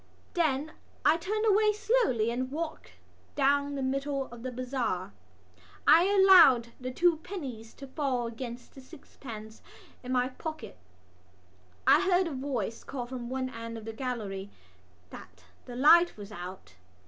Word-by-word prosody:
Then 310 -3 0 0.3
I 310 - +6
turned 425 +6 -2
away 425 0 +4
slowly 420 - +1
and 255 +2 -3
walked 315 +3 -6 0.4
down 285 0 +2
the 270 - -3
middle 275 +1 -1
of 240 -1 -10
the 255 +1 -5
bazaar. 245 - -3 0.7
I 335 +3 +7
allowed 370 - +6
the 255 0 -5
two 335 +5 +2
pennies 270 - -7
to 275 - -9
fall 265 -3 -2
against 235 +1 -7
the 270 - -12
sixpence 230 -6 -11 0.4
in 250 - -7
my 250 0 +1
pocket. 310 - -8 1.1
I - - +6
heard 370 -1 +3
a 330 - -4
voice 255 -5 -3
call 255 -3 -5
from 240 -1 -7
one 260 0 -3
end 230 -1 -7
of 220 - -10
the 225 - -6
gallery 215 -6 -4 0.6
that 95 -1 -13 0.2
the 245 - -9
light 330 +5 +5
was 205 0 -9
out. 180 - -9
260 Hz, 150 wpm, -29 LUFS, 230-315 Hz, 1.1 s, I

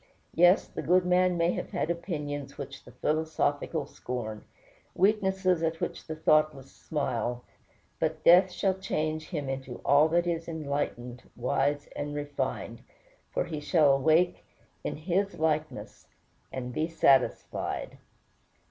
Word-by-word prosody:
Yes, 175 +3 +5
the - - -6
good 180 +1 +3
man 180 0 +3
may 170 +1 +2
have - - -4
had 165 - -1
opinions 150 -5 -4
which - - -8
the - - -13
philosophical 155 -1 -1
scorn, 120 -6 -6 0.5
weaknesses 190 -3 +2
at 165 0 -1
which - - -4
the 155 - -4
thoughtless 155 -3 +2
smile; 125 -5 -3 0.6
but 160 -1 -1
death 180 +2 +7
shall 190 +1 0
change 155 -4 -2
him 150 -6 -3
into 135 -2 -5
all 145 +3 +6
that 170 +2 +2
is 165 -1 -2
enlightened, 140 -6 -4
wise, 140 +4 0
and 145 0 -4
refined, 145 -1 -3 0.5
for - - -1
he 160 -3 -5
shall 150 -2 +4
awake 160 +6 +2 0.4
in - - -3
"His" 180 +4 -1
likeness, 155 -1 -2 0.4
and 125 -1 -5
"be 155 +6 0
satisfied." 140 -6 +1
155 Hz, 130 wpm, -29 LUFS, 140-175 Hz, 0.6 s, death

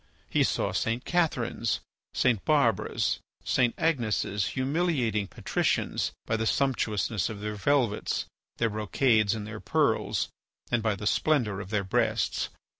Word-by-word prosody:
He - - +3
saw - - 0
St. 115 +2 -1
Catherines, 125 -10 0 0.4
St. 120 -6 +2
Barbaras, 130 -10 +2 0.2
St. 125 -2 +2
Agneses 115 - 0
humiliating 130 - 0
patricians - - -1
by 110 - 0
the 110 0 0
sumptuousness 110 -8 0
of 110 -2 -6
their 105 +1 -3
velvets, 115 0 +1 0.3
their 115 -2 +1
brocades, 110 0 +2
and 105 -2 -5
their 105 0 -7
pearls, - - +1 0.4
and 120 - +2
by 110 -2 +1
the 105 - -7
splendour 115 -6 +2
of 95 -2 -7
their 105 -2 0
breasts. 95 - 0
115 Hz, 130 wpm, -28 LUFS, 105-130 Hz, 0.4 s, He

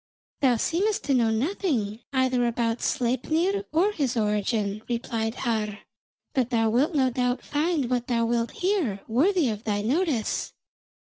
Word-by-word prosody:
"Thou 260 -3 +4
seemest 385 - 0
to 280 - +1
know 235 -3 +3
nothing 230 - -1
either 260 -2 +2
about 230 0 -1
Sleipnir 315 +11 0
or 360 +7 +3
his 275 - -1
origin," 210 -1 0
replied 230 -1 -2
Har, 215 -5 -1 0.6
"but 255 -3 +1
thou 225 -3 +2
wilt 290 +9 +2
no 260 -3 +3
doubt 250 +1 -1
find 300 -2 0
what 245 -1 -1
thou 235 -2 +1
wilt 235 0 0 0.2
hear 320 - +1
worthy 310 - +3
of 215 0 -4
thy 205 -1 -1
notice. 275 - 0
245 Hz, 145 wpm, -26 LUFS, 225-300 Hz, 0.6 s, Thou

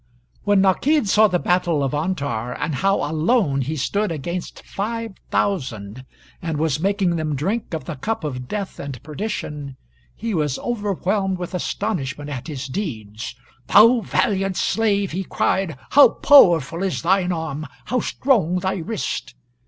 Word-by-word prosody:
] - - -36
When 205 -1 +4
Nakid 235 +8 +3
saw 215 +2 +5
the 180 -3 +1
battle 175 -4 +1
of 135 - -1
Antar, 145 -8 -2
and 155 - -1
how 195 +8 +1
alone 155 - +1
he 145 +5 -2
stood 200 +7 -1
against 170 +4 -5
five 225 +1 -4 0.2
thousand, 130 - -2 0.4
and 165 -3 -2
was 150 -2 0
making 190 -1 +1
them 155 -2 -1
drink 190 - -2
of 155 - -6
the 155 -1 -5
cup 220 +7 -3
of 125 -4 -4
death 200 +4 -4
and 140 -3 -6
perdition, 150 -5 -5 0.4
he 230 -1 -3
was 150 -6 0
overwhelmed 200 -4 -1
with 180 +1 -6
astonishment 150 -7 -3
at 130 0 -5
his 140 -4 -5
deeds. 115 - -5 0.3
"Thou 230 +3 +7
valiant 195 -3 0
slave," 205 -3 +1
he 185 +4 -2
cried, 185 -4 0
"how 285 +1 +8
powerful 170 - +5
is 190 -3 -1
thine 185 +1 +2
arm 160 -3 -3 0.2
how 250 - 0
strong 205 - +1
thy 190 +1 -1
wrist!" 200 +5 -4
175 Hz, 155 wpm, -22 LUFS, 145-200 Hz, 0.4 s, how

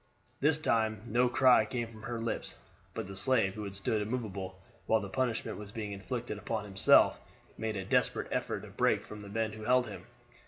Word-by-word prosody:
This 150 +2 +4
time 110 -8 +1
no 120 +2 +2
cry 125 -2 +6
came 120 +2 -3
from 110 -1 -13
her 120 +1 -4
lips, 115 0 -3 0.4
but 115 - -3
the 95 +1 -8
slave, 110 -2 +2
who 105 0 -5
had 100 -1 -6
stood 105 +2 0
immovable 100 -5 -4 0.3
while 110 - +4
the 100 -2 -6
punishment 120 0 -1
was 105 -1 -8
being 105 -2 -5
inflicted 105 +3 -4
upon 110 0 -2
himself, 95 -2 +5 0.4
made 110 -1 -3
a 95 -2 -3
desperate - - +1
effort - - -1
to - - -10
break - - +1
from 105 -1 -9
the 100 - -9
men 110 +1 -1
who 110 0 -8
held 125 +1 +4
him. 105 - -9
110 Hz, 200 wpm, -32 LUFS, 100-120 Hz, 0.4 s, cry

